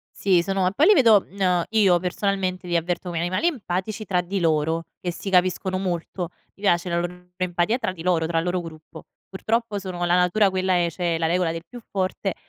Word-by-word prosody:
Sì, 185 -3 +3
sono 195 0 0
e - - -3
poi 285 +10 +3
li 420 - +8
vedo 225 - +6
mhmm, 200 +2 -14
uhm, 180 -2 +2
io 200 -5 +4
personalmente, 185 0 -2
li 175 -1 0
avverto 175 +2 -2
come 170 -1 -3
animali 175 - 0
empatici 215 - -2
tra 180 -3 +1
di 185 +2 -3
loro, 160 0 +1 0.2
che 180 - -2
si 185 +3 -6
capiscono 185 0 +2
molto. 180 -1 -3 0.3
Mi 195 - -20
piace 175 -3 +2
la 170 0 +1
loro 180 +1 -7
empatia 180 +4 0
tra 225 -7 -2
di 170 -3 -9
loro, 170 -2 +1
tra 165 0 0
il 165 - -1
loro 180 0 -1
gruppo. 160 -2 -11 0.2
Purtroppo 220 +2 -1
sono 185 -2 -4
la 175 0 +2
natura 180 +3 +3
quella 185 0 0
è, 175 -1 +2
c'è 170 0 -1
la 165 - +1
regola 175 0 +1
del 165 0 -5
più 245 - -10
forte 190 0 -2
180 Hz, 220 wpm, -23 LUFS, 175-195 Hz, 0.3 s, li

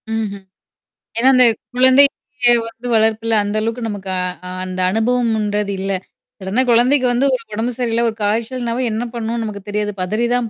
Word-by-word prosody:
ம்ஹ்ம். 215 -3 -3 0.8
ஏன்னா, 250 +3 +4
அந்த 255 - +7 0.3
கொழந்தைக்கே 255 -1 +4
வந்து 230 +2 -9
வளர்ப்புல 225 0 +1
அந்த 205 +1 -3
அளவுக்கு 230 +2 -3
நமக்கு 200 -2 -6 0.4
அ - - -6 0.2
அந்த 185 0 -6
அனுபவம்ன்றது 220 -2 0
இல்ல. 195 +1 -2 0.5
சடனா 195 +6 0
குழந்தைக்கு 250 +3 +4
வந்து 245 +3 +1
ஒரு 250 -3 -1
உடம்பு 225 +3 -1
சரியில்ல 235 -2 0
ஒரு 220 - -7
காய்ச்சல்னாவும் 235 +3 -1
என்ன 220 +2 -2
பண்ணவும்னு 230 0 -3
நமக்கு 210 -2 -6
தெரியாது. 210 0 -1
பதறி 215 +6 -1
தான் 245 -2 -1
225 Hz, 155 wpm, -18 LUFS, 210-245 Hz, 0.8 s, அந்த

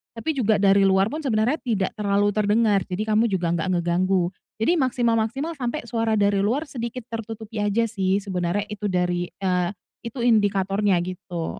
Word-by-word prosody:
tapi 305 +6 -2
juga 220 -5 +2
dari 200 0 +4
luar 195 +1 +4
pun 305 +6 -4
sebenarnya 235 +2 +1
tidak 210 -6 -1
terlalu 205 -1 +1
terdengar, 210 0 +2
jadi 190 +3 -2
kamu 230 +2 +4
juga 175 -3 0
gak 170 +1 -1
ngeganggu. 180 +1 +1 0.2
Jadi 310 +10 +1
maksimal-maksimal 245 +3 0
sampai 250 +5 -2
suara 225 -2 0
dari 200 -1 +2
luar 240 +10 +1
sedikit 245 -4 -6
tertutupi 225 -1 -6
aja 205 +3 +1
sih 195 -3 0
sebenernya 185 0 -1
itu 210 0 -3
dari 180 -1 0
eee, 180 -2 -1 0.4
itu 235 +1 -5
indikatornya 200 -3 +2
gitu. 180 -2 -5
205 Hz, 160 wpm, -23 LUFS, 190-230 Hz, 0.4 s, dari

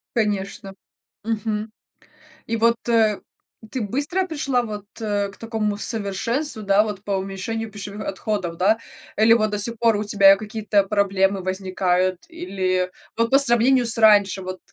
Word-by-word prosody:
Конечно, 200 -3 -2 0.5
мгм. 215 -1 -3 0.7
И 230 - -2
вот, 230 +1 +3
э, 220 -3 +3 0.5
ты 260 - -3
быстро 290 - -1
пришла 275 -6 0
вот, 210 -3 -6 0.2
э, 205 -2 -1
к 200 - -17
такому 220 -2 -2
совершенству, 225 +5 -2
да, 200 +1 +4
вот 210 -2 -6
по 205 - -5
уменьшению 195 +4 -4
пищевых 205 0 -7
отходов, 190 -3 -3
да, 205 +5 +3 0.4
или 220 +1 +6
вот 215 -2 +2
до 210 - -1
сих 230 +3 -2
пор 230 -2 +3
у 210 - -2
тебя 200 -1 +6
какие-то 210 -1 0
проблемы 195 -1 +1
возникают 185 -1 -1
или 185 - -2 0.3
вот 230 0 +1
по 275 - +6
сравнению 245 0 +4
с 235 - +2
раньше, 205 -3 +4
вот 185 0 -6
210 Hz, 150 wpm, -22 LUFS, 195-230 Hz, 0.7 s, или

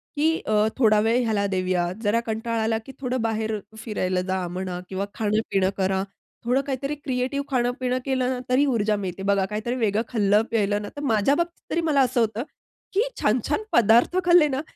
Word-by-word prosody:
की 305 +2 +3
अ, 215 0 +2
थोडा 215 -5 +4
वेळ 230 +4 +2
ह्याला 215 -3 0
देऊया. 185 -2 0
जरा 220 +1 +2
कंटाळा 225 0 -2
आला 225 0 +1
की - - -9
थोडं 255 -2 -2
बाहेर 220 -1 -1 0.2
फिरायला 185 -5 -2
जा 185 -1 -2
म्हणा 180 0 -4
किंवा 190 +1 -2
खाणं 215 -1 0
पिणं 190 -1 +2
करा. 190 0 +1 0.4
थोडं 250 +3 +2
काहीतरी 275 +2 -2
क्रिएटिव्ह 275 0 -2
खाणं 245 -3 +1
पिणं 255 0 0
केलं 260 -2 0
ना, 255 -1 -2
तरी 260 +3 +4
ऊर्जा 220 -6 +1
मिळते. 190 -1 -5
बघा 200 -1 +2
काहीतरी 220 +4 -2
वेगळं 220 -3 +1
खाल्लं 210 -3 +3
प्यायलं 205 -2 +1
ना, 205 - -6
तर 290 - -6
माझ्या 225 +1 +2
बाबतीत 340 +2 -4
तरी 335 - +1
मला 305 -4 +2
असं 255 -1 +2
होतं 225 +1 0 0.5
की 425 +6 +2
छान-छान 250 - +1
पदार्थ 235 - +4
खाल्ले 345 -3 +6
ना, 270 -1 -2
225 Hz, 190 wpm, -24 LUFS, 205-260 Hz, 0.5 s, खाल्ले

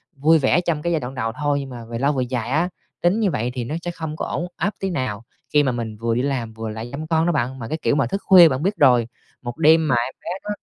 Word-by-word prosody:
vui 155 +4 +4
vẻ 145 +4 +3
trong 165 -4 -1
cái 170 - -1
giai 160 - +1
đoạn 125 +1 -6
đầu 115 -3 -2
thôi, 145 -1 +1
nhưng 135 -1 -6
mà 120 -2 -8
về 115 0 -5
lâu 140 +2 +2
về 130 -2 0
dài 120 -2 -2
á, 160 +6 +1 0.3
tính 175 +5 +2
như 205 -5 +2
vậy 120 +3 -2
thì 125 -2 -3
nó 145 +7 -4
sẽ 175 - -2
không 160 -2 -6
có - - -3
ổn 175 - -3
áp 195 +5 -1
tí 195 - -2
nào 130 - -3 0.3
khi 150 -1 +5
mà 135 - +1
mình 115 -3 -5
vừa 115 +1 -1
đi 125 - +1
làm, 130 -5 -2
vừa 110 0 -5
lại 110 +2 -6
chăm 155 +4 -6
con 160 0 +2
đó 175 - +2
bạn. 130 -2 -2
Mà 115 - -6
cái 155 - -2
kiểu - - +2
mà 140 -4 +2
thức 195 +10 -3
khuya 180 -4 +8
bạn 130 +2 -2
biết 195 +3 +1
rồi, 125 -5 +4 0.3
1 120 -1 -6
đêm 160 0 +5
mà 130 - +3
em 120 +2 -1
bé - - -7
nó 210 - -7
140 Hz, 305 wpm, -22 LUFS, 120-160 Hz, 0.3 s, khuya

